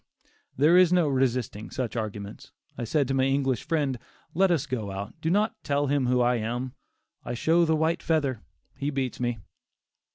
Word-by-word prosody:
There 150 +5 +5
was 180 -1 +6
no 175 -3 +4
resisting 125 -5 -1
such 125 -3 -4
arguments. 105 -2 -5 0.2
I 120 - -4
said 140 +3 +1
to 135 - -1
my 130 -1 +2
English 135 -3 +1
friend, 145 -6 -1 0.3
"Let 190 +3 +3
us 165 -5 +1
go 120 -8 -3
out; 100 +2 -5
do 160 - 0
not 210 +5 +2
tell 145 0 +1
him 140 -2 +1
who 125 0 +3
I 120 0 +3
am; 120 +3 -3 0.5
I 120 - -4
show 165 +7 +3
the 160 -1 +2
white 160 +2 +1
feather; 140 -7 0 0.3
he 140 - -2
beats 135 -3 -3
me." 120 -1 -1
135 Hz, 185 wpm, -27 LUFS, 120-155 Hz, 0.5 s, was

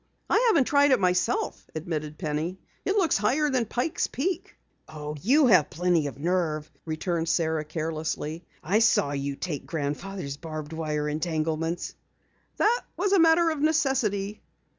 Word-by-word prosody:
"I - - +4
haven't 415 - +5
tried 285 +2 +4
it 260 -3 +4
myself," 180 -1 0
admitted 155 -2 -4
Penny. 160 +2 -2 0.3
"It 390 - +1
looks 360 -8 +3
higher 280 +8 +1
than 250 -4 +1
Pike's 245 +8 -1
Peak." 355 +6 -3 0.3
"Oh, 150 -1 -6
you 275 - +4
have 185 - +5
plenty 170 -2 +1
of 140 - -7
nerve," 155 -1 -1
returned 165 +1 -2
Sara 160 -2 +1
carelessly. 155 +1 -3 0.2
"I 195 +7 +2
saw 220 -10 +3
you 140 0 -2
take 150 -2 -5
Grandfather's 150 0 -4
barbed 155 -1 -6
wire 150 -2 -2
entanglements." 160 +2 -2 0.6
"That 475 +3 +3 0.2
was 405 - +1
a 395 - +5
matter 330 0 +5
of 305 -2 -3
necessity." 255 - +1
175 Hz, 145 wpm, -27 LUFS, 155-260 Hz, 0.6 s, haven't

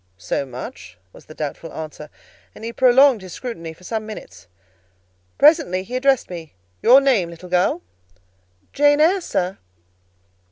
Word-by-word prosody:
"So 135 +8 -3
much?" 95 -8 -9 0.2
was - - -16
the 155 - -13
doubtful 155 +2 -5
answer; 155 -1 -8 0.5
and - - -12
he 230 +1 -5
prolonged 260 -1 +5
his 185 -2 -10
scrutiny 170 -11 -6
for 160 +3 -17
some 220 +3 -3
minutes. 215 - -10 0.9
Presently 290 - +4
he 240 +6 -7
addressed 265 0 +2
me—"Your 155 - +1
name, 250 -11 +2
little 170 +2 -11
girl?" 180 0 +1 0.9
"Jane 290 +1 +4
Eyre, 360 +5 +4
sir." 185 - -2
185 Hz, 135 wpm, -21 LUFS, 160-260 Hz, 0.9 s, prolonged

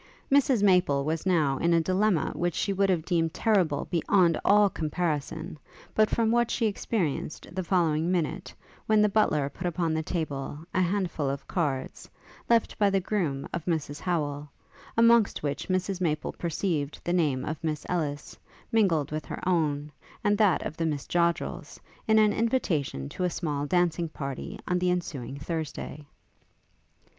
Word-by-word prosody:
Mrs 270 -6 +4
Maple 180 -8 +4
was 160 +4 -2
now 155 -7 +2
in 170 0 +3
a - - +5
dilemma 185 +1 +1
which 175 -1 -1
she 200 - 0
would 195 0 +2
have 170 -4 +1
deemed 165 -2 0
terrible 185 -9 +2
beyond 170 0 +3
all 205 0 +5
comparison, 160 -1 -3 0.3
but 215 0 +3
from 225 -1 +1
what 235 0 +2
she 230 - 0
experienced 195 -8 -2
the 185 0 -2
following 170 -2 +1
minute, 175 -4 -2 0.4
when 215 -1 +4
the - - +5
butler 160 -9 +2
put 175 +6 -5
upon 165 -1 -1
the 160 - 0
table 150 -4 -3 0.2
a 185 - +2
handful 175 -6 0
of 140 0 -5
cards, 140 -7 -2 0.4
left 230 -1 +2
by 205 -1 +4
the 195 0 +2
groom 175 -8 -2
of 170 - -3
Mrs 155 -4 -2
Howel, 150 -5 -2 0.5
amongst 230 -5 +4
which 145 -1 -3
Mrs 185 0 -1
Maple 155 -3 -1
perceived 160 -3 -2
the 175 - -1
name 150 -7 +1
of 155 0 -5
Miss 155 -2 -2
Ellis, 150 -5 -3 0.4
mingled 185 - +2
with 155 -2 -3
her - - -6
own, 150 -4 0 0.3
and 205 0 +3
that 205 -6 +3
of 155 - -5
the 165 - 0
Miss 145 -3 -2
Joddrels, 170 -1 -1 0.3
in 220 0 +5
an 215 -1 +5
invitation 170 - 0
to 185 - -4
a 180 - +2
small 145 -4 -2
dancing 175 -1 +1
party 140 -3 -6
on 180 0 +1
the 180 0 +1
ensuing 145 -7 -3
Thursday. 150 -1 -5
170 Hz, 165 wpm, -27 LUFS, 150-190 Hz, 0.5 s, a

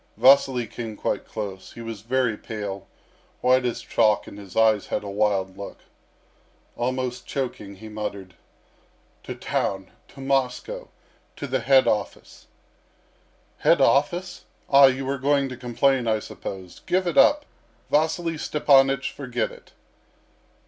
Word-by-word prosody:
Vasily 130 0 +5
came 115 -2 -7
quite - - -2
close. 100 -3 -6
He 115 - -9
was 115 -3 -7
very 125 0 0
pale, 105 -3 -6 0.5
white 130 0 +3
as 120 - -2
chalk, 105 -1 +2
and 100 - -11
his 100 -3 -12
eyes 110 -2 +3
had - - -2
a 100 - -6
wild 100 -2 0
look. 100 - -7 1.0
Almost 125 0 -3
choking, 115 -7 -4
he 110 +3 -11
muttered: 100 -3 -6 0.9
"To - - -5
town 95 -1 -2 0.2
to 140 - -16
Moscow 135 - -1 0.5
to - - -6
the 130 -1 -1
head 130 +2 +4
office." 105 -2 -3 1.1
"Head - - +4
office? 180 +6 +1 0.3
Ah, 140 0 +9
you 130 0 -1
are 140 0 -2
going 140 0 +2
to 130 - -6
complain, 125 +1 +1
I 110 -1 +2
suppose. 95 -4 -8
Give 185 +1 +1
it 175 - -1
up! 290 +2 +5 0.5
Vasily 160 +2 +1
Stepanych, 135 -3 +3
forget 125 -3 -3
it." - - -16
125 Hz, 135 wpm, -24 LUFS, 105-135 Hz, 1.1 s, Ah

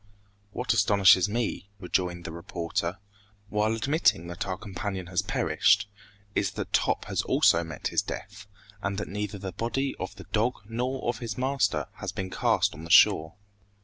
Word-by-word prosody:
"What 125 +2 0
astonishes 100 -3 +5
me," 105 -3 -2
rejoined 90 -2 -1
the - - -5
reporter, 85 +1 -3 0.5
"while 105 +2 +1
admitting 135 - +2
that 85 - -4
our 95 -1 -2
companion 95 -2 -5
has 90 0 0
perished, 100 0 +2 0.5
is - - +1
that - - -5
Top - - +1
has - - -1
also 85 +1 +3
met 80 -3 -4
his - - +2
death, 105 +1 -8 0.3
and 100 -1 -2
that - - -3
neither 105 +1 -4
the 95 -1 -5
body 130 +8 -2
of 95 - -5
the 95 - -11
dog 115 +4 +2
nor 125 +4 -3
of 120 - -1
his 115 -4 -5
master 130 -5 +1
has - - -4
been 95 -1 -5
cast - - +2
on 80 - -10
the 85 - -8
shore!" 80 0 +6
100 Hz, 170 wpm, -27 LUFS, 90-115 Hz, 0.5 s, shore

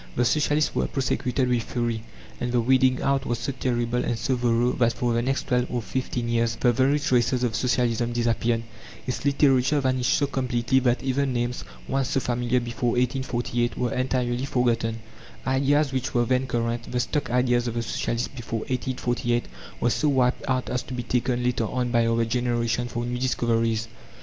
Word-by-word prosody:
The 125 - +2
Socialists 150 +3 +2
were - - 0
prosecuted 130 -1 0
with 125 -1 +1
fury, 120 -1 -2 0.4
and 120 - -2
the 125 - +2
weeding 130 +2 +3
out 135 0 +1
was 120 -2 -1
so 120 +4 -3
terrible 125 -2 -1
and 120 - -1
so 130 - 0
thorough 120 0 +2
that 120 -2 +2
for 120 0 -1
the 115 - +1
next 135 +3 -1
twelve 125 -1 +2
or 120 -2 -2
fifteen 120 +2 -3
years 115 0 +1
the 120 - +4
very 135 +4 +3
traces 125 -2 +1
of 120 -3 0
Socialism 120 -2 +1
disappeared; 115 -1 0 0.4
its 125 - -3
literature 140 0 +3
vanished 130 -2 +1
so 145 - +2
completely 130 -2 +1
that 125 -1 +1
even 135 0 0
names, 120 0 -2 0.2
once 135 -1 0
so - - +1
familiar 120 0 0
before 120 0 -2
1848, 120 -1 -1
were 125 -2 -1
entirely 125 -1 0
forgotten; 115 -3 0 0.4
ideas 135 +2 +2
which 130 -1 -2
were 120 0 +3
then 130 +1 +1
current 115 -1 -2
the 125 - 0
stock 145 +4 -1
ideas 125 0 +2
of 115 - -3
the 115 - -1
Socialists 115 +1 -2
before 115 -3 -5
1848 120 -1 -1 0.3
were 120 - +2
so 150 - +1
wiped 130 -2 +2
out 130 -1 0
as 125 - 0
to 130 - -7
be 120 - -3
taken, 125 +1 0
later 120 -2 0
on, 125 +2 -2
by 115 -1 +3
our 115 0 +2
generation, 120 0 0
for 120 0 -3
new 120 0 -3
discoveries. 115 -3 0
125 Hz, 185 wpm, -25 LUFS, 120-130 Hz, 0.4 s, the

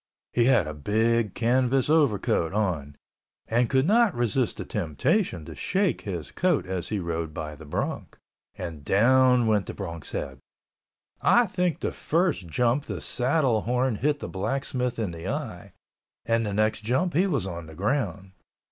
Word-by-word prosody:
He 120 - +3
had 125 -8 +4
a 75 - -5
big 110 +7 +1
canvas 125 +2 +2
overcoat 130 - +2
on 85 -9 -1 0.5
and 120 +1 +2
could 130 0 +3
not 220 +1 +4
resist 120 0 0
the - - -5
temptation 95 - -1
to 80 - -8
shake 190 - 0
his 85 -7 -5
coat 175 - +1
as 90 -2 -3
he 105 - -1
rode 85 -3 -3
by 75 -1 -5
the 75 0 -12
bronc—and 80 +1 -6
down 125 - +4
went 105 -3 +1
the - - -6
bronc's 85 -7 -5
head. 65 -2 -4 0.8
I 240 0 +5
think 180 -5 -1
the - - -1
first 165 - 0
jump 120 - +1
the - - -5
saddle 130 -3 +1
horn 125 0 0
hit 145 +5 +1
the - - -6
blacksmith 125 +4 -2
in 110 -6 -2
the 85 0 -7
eye, 110 - -5 0.5
and 115 -1 +1
the 100 - -3
next 110 +1 +1
jump 145 +11 0
he 180 +6 +3
was 140 - 0
on 85 -3 -6
the 80 - -11
ground. 100 - -2
115 Hz, 165 wpm, -26 LUFS, 90-135 Hz, 0.8 s, I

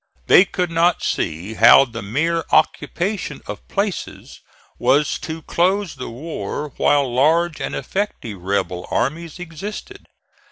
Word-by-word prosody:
They 185 - +7
could 180 -2 -2
not 170 +1 +2
see 85 +6 -2
how 135 - +7
the 115 -3 -8
mere 160 +11 0
occupation 175 +6 0
of - - -8
places 200 -1 -4 0.4
was 140 +4 +2
to 160 -2 -6
close 190 +1 +1
the 130 -2 -7
war 150 +3 -5
while 140 -4 +2
large 160 +5 +2
and - - -3
effective 130 - -4
rebel 90 -1 -2
armies 160 +5 -2
existed. 200 - -8
155 Hz, 125 wpm, -20 LUFS, 125-175 Hz, 0.4 s, They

